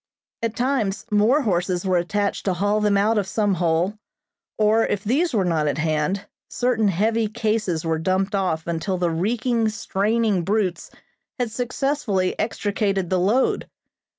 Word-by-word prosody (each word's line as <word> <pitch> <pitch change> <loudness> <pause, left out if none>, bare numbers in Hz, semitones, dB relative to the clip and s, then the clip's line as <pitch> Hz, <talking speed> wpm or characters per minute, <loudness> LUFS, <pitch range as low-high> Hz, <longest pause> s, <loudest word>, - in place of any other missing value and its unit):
At 230 -1 -2
times 240 -6 -1
more 220 +8 +4
horses 180 -3 0
were 185 -2 +2
attached 200 +3 -2
to 190 -2 +1
haul 205 +3 +1
them 205 -1 +3
out 215 +2 +3
of 195 - -2
some 205 -1 +1
hole, 175 +4 0 0.6
or 220 +1 +3
if 200 -1 -1
these 290 +11 +1
were 205 -5 +1
not 160 -3 +1
at 145 - -1
hand, 155 +5 -1 0.2
certain 245 -4 +1
heavy 220 +4 +1
cases 215 -6 -1
were 160 -1 0
dumped 190 +4 0
off 180 -5 -1
until 170 +3 -2
the 175 -1 0
reeking, 225 +6 0
straining 215 -1 0
brutes 195 -1 -1 0.5
had 245 -4 -2
successfully 245 -5 -1
extricated 200 -3 -1
the 185 - +2
load. 215 +9 +1
205 Hz, 150 wpm, -23 LUFS, 180-225 Hz, 0.6 s, more